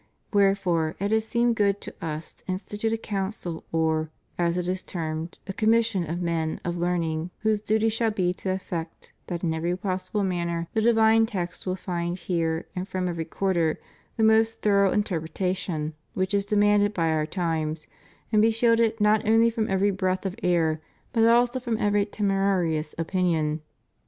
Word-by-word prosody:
Wherefore, 190 -5 +2
it 200 +2 -1
has 220 0 +1
seemed 235 0 +2
good 200 -1 +2
to - - -7
Us 155 0 -5
to - - -30
institute 205 +4 -2
a 225 - +1
council 195 -5 -4
or, 160 -1 +1 0.3
as 170 0 0
it 180 -1 -1
is 185 +1 -1
termed, 160 -1 -5
a 195 - -5
commission 220 -5 +2
of 175 +2 -2
men 165 -2 -1
of 175 0 -1
learn 175 0 0
ing 160 +1 -2
whose 220 -1 +1
duty 220 +1 +2
shall 225 +1 +1
be 185 -4 0
to 190 - -5
effect 175 -3 -5
that 175 0 -4
in 165 -2 +1
every 170 +3 -1
possible 185 +1 -2
manner 170 -2 -1
the 220 - +1
divine 225 0 +5
text 180 -3 -4
will 185 - 0
find 175 -2 -3
here 165 -2 -1
and 185 +1 -3
from 185 -2 -2
every 170 -2 -3
quarter 170 -2 0 0.4
the 220 - +2
most 220 +1 +3
thorough 200 -2 +4
interpretation 175 -3 -2 0.2
which 185 +1 -1
is 200 0 +1
de 210 - 0
manded 205 0 +4
by 165 -2 +1
our 155 -1 +1
times, 160 -3 -2 0.5
and 215 -2 +4
be 225 - +5
shielded 230 0 +2
not 210 0 +4
only 225 +1 +5
from 225 -1 -1
every 195 +1 +2
breath 185 0 -1
of 190 -1 -2
error, 165 -4 +1 0.3
but 225 -2 +4
also 240 +2 +4
from 235 -3 -2
every 205 -1 +2
temerarious 195 -6 0
opinion. 165 -3 0
185 Hz, 175 wpm, -26 LUFS, 170-210 Hz, 0.5 s, divine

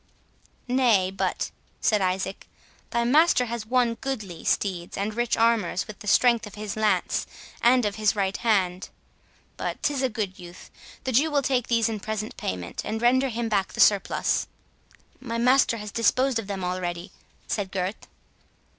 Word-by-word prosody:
"Nay, 235 -7 +3
but," 195 - -2 0.3
said 210 -2 +2
Isaac, 190 +1 -2 0.4
"thy 235 0 0
master 285 +1 +4
has 230 -2 -5
won 245 -1 +2
goodly 215 -9 -5
steeds 180 -4 -1
and 205 +2 -2
rich 240 +1 0
armours 225 -6 +2
with 215 - -10
the 210 - -10
strength 235 0 +4
of 210 - -11
his 210 -1 -5
lance, 210 -4 +1 0.3
and 245 0 +4
of 205 0 -2
his 215 -1 +2
right 195 -1 0
hand—but 190 -5 -3
'tis 285 -2 0
a 260 - +1
good 210 -4 -4
youth—the 175 +8 -10
Jew 280 +7 +3
will 285 -2 +1
take 250 -3 0
these 230 -2 +2
in 220 -2 -3
present 215 +1 -4
payment, 90 -2 -4
and 220 - -3
render 260 +3 +3
him 235 0 -2
back 200 -3 0
the - - -8
surplus." 200 -2 +3 0.7
"My 230 -3 -4
master 250 0 +4
has 210 -1 -7
disposed 250 +3 +2
of 215 - -7
them 195 -2 -4
already," 180 -1 -3 0.3
said 200 -3 -3
Gurth. 190 +2 -3
215 Hz, 160 wpm, -25 LUFS, 195-240 Hz, 0.7 s, master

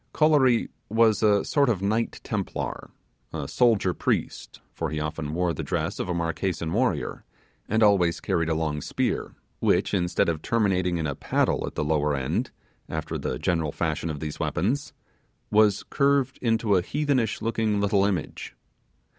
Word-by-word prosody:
Kolory 145 -6 +4 0.2
was 110 0 +3
a 105 -2 +3
sort 140 -3 +2
of 100 -5 0
Knight 110 +3 0
Templar - - -4 0.4
a 75 -4 -4
soldier 110 - +2
priest; - - -2
for 80 - -3
he 75 +1 -3
often 75 0 -4
wore 90 -1 +1
the - - -4
dress - - -2
of - - -3
a - - 0
Marquesan 85 0 -2
warrior, 105 - 0 0.5
and 110 +1 +3
always 95 -5 +4
carried 85 -1 0
a 80 - +1
long 80 -2 -1
spear, - - -2 0.2
which, - - +2
instead 90 -3 +1
of 80 -2 -1
terminating 95 -6 +1
in 80 - -2
a 70 - -1
paddle - - 0
at - - -7
the 75 - -1
lower 75 -1 +1
end, 65 -2 -1 0.4
after - - -4
the - - -3
general 80 -4 0
fashion 80 +1 -2
of 75 -2 -4
these 75 -2 -5
weapons, 140 +9 -1 0.6
was 105 -1 +4
curved 140 -2 +2
into 115 -3 +2
a - - +2
heathenish 135 -1 0
looking 110 -2 0
little 100 -1 +2
image. 95 -5 -2
95 Hz, 165 wpm, -26 LUFS, 80-115 Hz, 0.6 s, Kolory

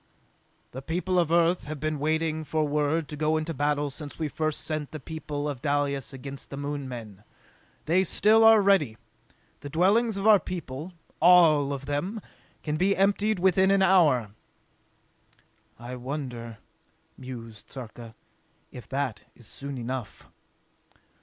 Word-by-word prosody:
"The 130 - -7
people 180 +5 -1
of 165 -2 +1
Earth 170 +1 +3
have 150 0 -6
been 155 0 -2
waiting 160 +1 0
for 155 0 -1
word 150 +2 0
to 150 - -6
go 155 +1 +1
into 155 +1 -3
battle 145 0 0
since 145 +1 -9
we 155 -2 -2
first 155 0 -2
sent 155 -2 -3
the 155 - -6
people 150 0 -5
of 140 -4 -5
Dalis 140 -2 -1
against 135 +1 -8
the 140 - -7
Moon 145 -1 -4
men. 110 -5 -9 0.6
They 180 +4 +3
still 215 +4 +4
are 225 -2 +7
ready! 165 - +3 0.6
The 145 - -8
dwellings 200 +8 +2
of 195 - -3
our 215 -2 +7
people, 170 -1 -6 0.3
all 160 -5 +6
of 140 -1 -5
them, 145 +10 -2 0.4
can 150 0 -2
be 195 +4 +2
emptied 200 +2 +2
within 190 +1 +3
an 195 0 +4
hour!" 150 - +4 1.5
"I 120 +2 -7
wonder," 125 -4 -6 0.6
mused 115 -4 -10
Sarka, 115 -3 -9 0.6
"if 125 - -11
that 135 -4 -3
is 120 - -16
soon 140 +4 -7
enough!" 120 -3 -6
150 Hz, 145 wpm, -27 LUFS, 135-175 Hz, 1.5 s, are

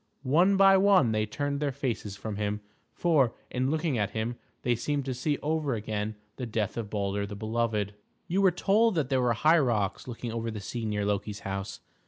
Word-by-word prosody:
One 175 +9 +4
by 195 0 +7
one 190 - +5
they 110 0 0
turned 140 +6 -2
their 145 -1 0
faces 120 -7 -3
from 100 +1 -5
him; 105 0 -2 0.3
for, 150 -9 +2 0.2
in 130 +1 0
looking 155 -4 0
at 105 -1 +1
him, 115 +2 -1 0.3
they 120 - +2
seemed 140 +4 -1
to 130 - -2
see 140 +4 -1
over 150 -4 0
again 105 0 -3 0.2
the 125 - -4
death 110 -2 -1
of 115 -3 -4
Baldur 100 -1 -1
the 100 - -7
Beloved. 110 -1 -1 0.3
You 190 +4 +1
were 195 - +6
told 205 +5 +2
that 150 -6 0
there 130 -2 +2
were 120 -1 +3
high 155 +9 +4
rocks 110 -8 0
looking 120 -1 -5
over 115 0 -3
the 110 -1 -5
sea 115 +3 -5
near 105 -1 -1
Loki's 100 0 -2
house. 95 0 -5
120 Hz, 205 wpm, -28 LUFS, 105-145 Hz, 0.3 s, by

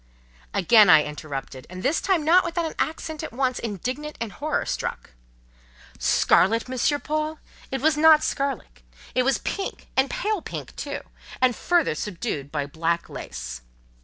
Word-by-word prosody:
Again 205 +2 +6
I 155 -3 +8
interrupted, 140 -3 -7
and 185 +1 -8
this 285 +5 +1
time 365 -6 +1
not 350 +4 +6
without 335 0 -1
an 320 - -4
accent 315 0 -2
at 315 - -6
once 255 +1 0
indignant 255 - -4
and 230 -2 -3
horror 300 +7 -2
struck. - - -4 0.9
"Scarlet, 225 +6 +3
Monsieur 260 +3 +1
Paul? 310 +1 -2 0.3
It 265 -1 -3
was 305 +1 +3
not 310 0 +7
scarlet! 270 - -3 0.3
It 255 - +3
was 270 +1 +2
pink, 390 -1 -5
and 265 +1 +3
pale 420 -2 -1
pink - - -7
too, - - -4 0.4
and 255 -2 +3
further 345 - +2
subdued 165 - -4
by 145 -2 -1
black 165 +3 -2
lace." - - -7
255 Hz, 155 wpm, -24 LUFS, -, 0.9 s, I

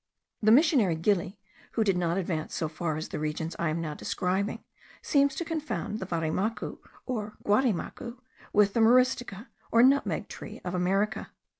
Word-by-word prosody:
The 215 - +4
missionary 255 - +5
Gili, 190 +3 0 0.4
who 225 - +2
did 195 -3 +2
not 175 0 0
advance 170 -4 -2
so 160 - -1
far 155 0 -3
as 155 - -5
the - - -4
regions 155 +2 -3
I 170 - +1
am 155 +2 -1
now 155 -2 -3
describing, 195 +8 -2 0.4
seems 280 -1 +3
to 340 - -3
confound 265 - -3
the 190 - -5
varimacu, 175 +6 -2 0.3
or 215 -5 -4
guarimacu, 235 +2 0 0.3
with 205 -1 +4
the - - +1
myristica, 245 -2 +3 0.2
or 230 +1 +6
nutmeg 275 +2 +3
tree - - -9
of 180 - -3
America. 195 +4 0
200 Hz, 160 wpm, -28 LUFS, 170-235 Hz, 0.4 s, or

